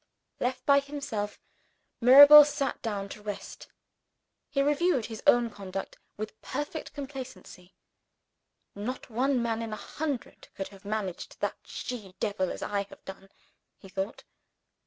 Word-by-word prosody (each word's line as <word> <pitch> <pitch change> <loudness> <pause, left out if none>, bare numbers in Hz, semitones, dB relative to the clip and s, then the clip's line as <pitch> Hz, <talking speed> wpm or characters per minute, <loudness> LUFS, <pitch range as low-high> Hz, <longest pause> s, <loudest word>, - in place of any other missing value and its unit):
Left 250 +1 -2
by 280 0 +6
himself, 275 -8 -5 0.6
Mirabel 285 +5 +11
sat 290 -1 -2
down 205 -3 -3
to 210 - -9
rest. 205 -1 -7 0.8
He 275 - +1
reviewed 295 -3 +2
his 225 -2 -7
own 240 -1 +5
conduct 195 -1 -6 0.2
with 215 +1 -7
perfect 295 +3 -5
complacency. 265 -10 -9 1.0
"Not 240 +5 -6
one 260 +3 +1
man 230 -1 -1
in 225 -1 -4
a 215 - -7
hundred 290 -5 -5
could 195 - -5
have 195 -1 -16
managed 205 -4 -4
that - - -1
she 210 -7 -7
devil 200 -4 -1
as - - -5
I 205 -1 -1
have - - -16
done," 195 0 -10 0.5
he 195 - -14
thought. 195 +2 -4
230 Hz, 135 wpm, -29 LUFS, 200-275 Hz, 1.0 s, Mirabel